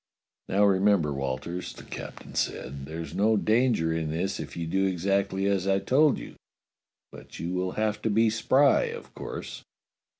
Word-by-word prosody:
"Now 100 +2 +4
remember, 95 -6 +3
Walters," 70 +6 -4
the - - -12
captain - - -9
said, 70 +1 -3
"there's 80 +1 -6
no 110 +2 +3
danger 110 -7 +2
in 80 -1 -2
this 85 +5 -2
if - - -7
you 85 - -2
do 95 +4 +1
exactly 95 +1 0
as 100 -1 +1
I 95 0 +3
told 140 +8 +3
you, - - -9 0.7
but - - -12
you 85 +3 -3
will 90 0 -1
have 105 -1 -1
to - - 0
be 110 +1 +3
spry, 130 - +4
of 470 -1 -7
course." - - -7
95 Hz, 165 wpm, -27 LUFS, 85-110 Hz, 0.7 s, Now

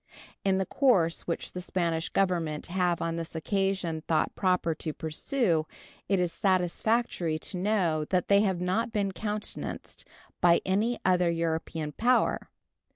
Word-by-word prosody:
In 195 -1 +2
the 190 - 0
course 185 - +2
which 170 - -3
the 180 - -5
Spanish 170 -3 -1
Government 170 -6 0
have 175 -1 0
on 165 0 -2
this 165 0 -6
occasion 190 -2 -1
thought 160 - +1
proper 180 -3 +1
to 155 0 -4
pursue 160 - 0 0.4
it 195 -2 +3
is 175 -2 0
satisfactory 185 -2 +1
to 170 - -6
know 180 -6 +1
that 180 +2 0
they 200 0 +5
have 190 -4 +1
not 215 +7 0
been 200 -3 0
countenanced 210 +3 -5 0.4
by 170 -1 +6
any 210 +6 +1
other 180 -2 +3
European 165 -2 -2
power. 245 - +1
180 Hz, 145 wpm, -28 LUFS, 165-195 Hz, 0.4 s, by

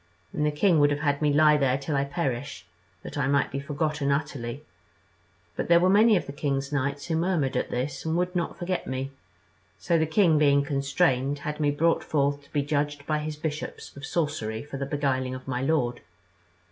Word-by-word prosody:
And 150 - -1
the - - +1
king 165 +2 +3
would 145 0 +5
have 145 0 -1
had 145 -1 0
me 150 -1 +3
lie 150 +1 +5
there 135 -2 +2
till 140 +2 -3
I 140 0 +1
perished, 135 - -3 0.4
that - - -6
I 135 - +1
might 140 0 +2
be 135 - -3
forgotten 145 0 -1
utterly; 140 -2 -3 0.9
but - - -3
there 170 0 +6
were 185 +2 +3
many 215 +1 +6
of - - -3
the - - -6
king's 140 -1 -2
knights 140 0 -1
who 165 - -1
murmured 165 -5 0
at - - -1
this, 130 +3 -3
and 160 +1 -1
would 180 +1 -1
not 170 -2 -2
forget 180 +1 -3
me; 130 +1 -3 0.7
so 165 - +1
the 160 - +1
king 160 -2 +4
being 140 -1 +4
constrained, 140 -1 +1
had 150 0 -3
me 150 -1 +2
brought 165 +3 +2
forth 145 -1 0
to - - -24
be 145 -2 0
judged 145 0 -1
by 155 0 0
his 150 0 -4
bishops 150 0 -5
of 140 - -11
sorcery 135 -9 -2
for 145 -1 -7
the 135 0 -3
beguiling 130 -3 -1
of 130 +1 -10
my 125 -1 -2
lord. 135 -4 0
145 Hz, 210 wpm, -26 LUFS, 140-155 Hz, 0.9 s, there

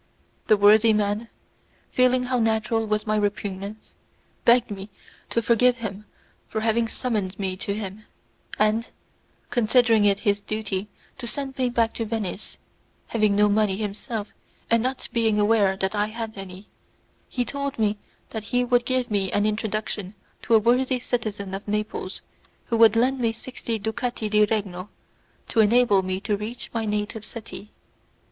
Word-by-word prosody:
The 215 - +5
worthy 215 +2 +6
man, 210 +2 0 0.6
feeling 255 0 +3
how 250 0 0
natural 225 0 +1
was 215 0 0
my 215 0 +1
repugnance, 205 0 -3 0.5
begged 235 -1 +5
me 195 0 -6 0.4
to 230 - 0
forgive 245 +2 +4
him 210 -3 -6 0.4
for 220 - -3
having 225 +1 +2
summoned 210 -6 -2
me 190 -2 -2
to 200 +1 -2
him, 210 0 -6 0.5
and, 215 +2 +2 0.6
considering 230 -2 +4
it 200 0 +3
his 205 -2 +1
duty 205 -2 -3 0.3
to 240 - -5
send 270 +1 -4
me 255 -1 +2
back 230 -2 +1
to 230 - -3
Venice, 215 -2 -4 0.5
having 215 -3 +2
no 210 +1 +5
money 205 -2 +2
himself 215 +1 -4 0.4
and 230 0 +4
not 255 +2 -2
being 225 -3 +2
aware 205 -2 +3
that 190 +1 -1
I 210 0 +1
had 225 0 -5
any, 195 0 -9 0.6
he 245 -1 -1
told 280 +1 -3
me 210 -2 +1 0.3
that 220 -2 -5
he 245 +2 +1
would 245 0 +2
give 255 -2 0
me 195 -2 0
an 205 0 +2
introduction 215 -2 -2 0.3
to 230 - +3
a - - +7
worthy 250 +4 +2
citizen 210 -5 -3
of 195 +2 -6
Naples 210 -2 -3 0.4
who 230 - 0
would 225 -1 +7
lend 255 +3 +2
me 230 -2 +2
sixty 230 0 -5
ducati 220 0 -3
di 210 0 +5
regno 200 -3 -3 0.6
to 230 - 0
enable 220 -2 +5
me 185 0 -2
to 210 0 0
reach 215 +4 -6
my 225 -1 -1
native 210 +1 -2
city. 220 -2 -9
215 Hz, 160 wpm, -24 LUFS, 205-235 Hz, 0.6 s, a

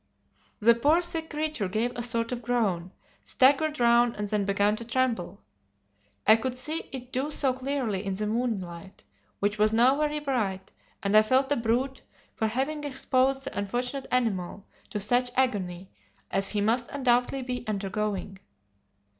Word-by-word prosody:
The 235 +2 +6
poor 295 +9 +3
sick 325 -2 -1
creature 305 -8 -2
gave 220 +6 0
a 240 - -3
sort 230 0 0
of 245 -1 -3
groan, 210 -8 0 0.3
staggered 290 +3 +3
round 235 0 +4
and 210 0 -3
then 205 -1 0
began 200 +1 +2
to 235 - -6
tremble. 230 -6 -1 0.8
I 220 +1 +7
could 255 +2 -3
see 310 +5 -3
it 255 -1 -8
do 265 +4 -1
so 275 -3 +1
clearly 255 -7 -2
in 195 -1 -2
the 210 +2 -2
moonlight, 195 -6 -3 0.3
which 205 +1 -1
was 215 0 +4
now 250 +5 +4
very 300 0 0
bright, 215 -10 -2 0.3
and 200 +1 +1
I 215 - +9
felt 260 +5 +2
a - - +5
brute 245 +3 -1 0.3
for 220 - -1
having 270 +7 -2
exposed 270 -1 +1
the - - -5
unfortunate 245 +7 -3
animal 200 -6 -1 0.2
to 210 - -3
such 245 +5 +2
agony 190 -8 -1 0.4
as 195 0 0
he 210 - 0
must 235 +4 +1
undoubtedly 255 -1 +1
be 250 -1 -4
undergoing. 200 -1 -3
235 Hz, 160 wpm, -27 LUFS, 205-265 Hz, 0.8 s, I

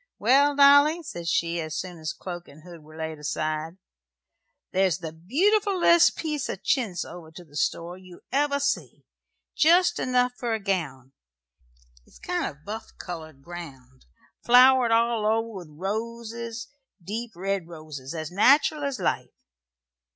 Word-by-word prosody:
"Well, 280 +6 +4
Dolly," 285 +4 +6
said 170 - -7
she, 170 0 0
as 155 -1 -5
soon 180 -2 -6
as 155 -1 -3
cloak 175 -2 -8
and 155 +2 -16
hood 170 -2 -12
were 155 +1 -15
laid 160 -1 -5
aside, 155 +3 -3 0.9
"there's 185 -3 +2
the 165 -3 -6
beautifulest 345 - +3
piece 305 -4 -3
of - - -5
chintz 225 -10 0
over 170 -1 -10
to 175 +2 -12
the 145 -2 -19
store 170 +4 -2
you 185 -2 -14
ever 280 +1 +1
see 280 0 -2 0.5
jest 345 +4 +4
enough 250 -1 +1
for 235 -2 -1
a - - -3
gown. 155 - -3 1.0
It's - - -18
kind 355 -1 -2
of 150 0 -11
buff 220 +2 -7
coloured 160 -6 -8
ground, 135 -7 -11 0.4
flowered 250 0 +6
all 230 -1 +2
over 225 +2 +1
with 180 -5 -9
roses, 230 +6 -5 0.3
deep 225 +6 -6
red 190 -1 -2
roses, 155 -4 -8
as 155 0 -5
nateral 280 - +4
as 280 -2 -2
life. - - -3
195 Hz, 145 wpm, -26 LUFS, 160-255 Hz, 1.0 s, Dolly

